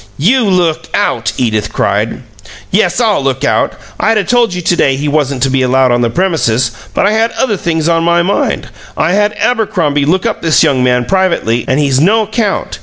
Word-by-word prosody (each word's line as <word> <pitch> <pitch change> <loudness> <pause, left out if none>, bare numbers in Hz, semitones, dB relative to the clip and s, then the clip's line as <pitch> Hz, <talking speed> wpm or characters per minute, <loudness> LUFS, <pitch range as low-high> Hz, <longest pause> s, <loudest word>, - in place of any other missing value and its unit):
"You 230 - +2
look 175 -5 0
out!" 135 - 0
Edith 110 -4 -1
cried. 105 +5 -1 0.5
"Yes, 185 0 +1
I'll 220 -8 +1
look 135 -1 -2
out! - - +1 0.3
I'd 225 0 +2
'a' 210 - +1
told 240 -2 +1
you 180 - -4
to 175 - +1
day 135 -5 +2
he 145 +3 -3
wasn't 140 -3 -1
to 135 - +2
be 135 0 +1
allowed 130 0 +2
on 120 0 +1
the 120 - +1
premises, 125 -8 0 0.2
but - - +2
I 200 - +2
had 225 +1 +1
other 250 -6 0
things 165 -3 -2
on 165 -1 +1
my 170 0 +2
mind. 195 +3 -1 0.3
I 160 - +1
had 205 +2 +1
Abercrombie 185 -12 0
look 180 +5 0
up - - -2
this 165 -2 +3
young 130 -2 +1
man 125 -1 +1
privately, 170 - 0
and 130 +2 +1
he's 140 -3 +1
no 215 +6 +3
'count. 210 - -3
165 Hz, 205 wpm, -12 LUFS, 130-200 Hz, 0.5 s, this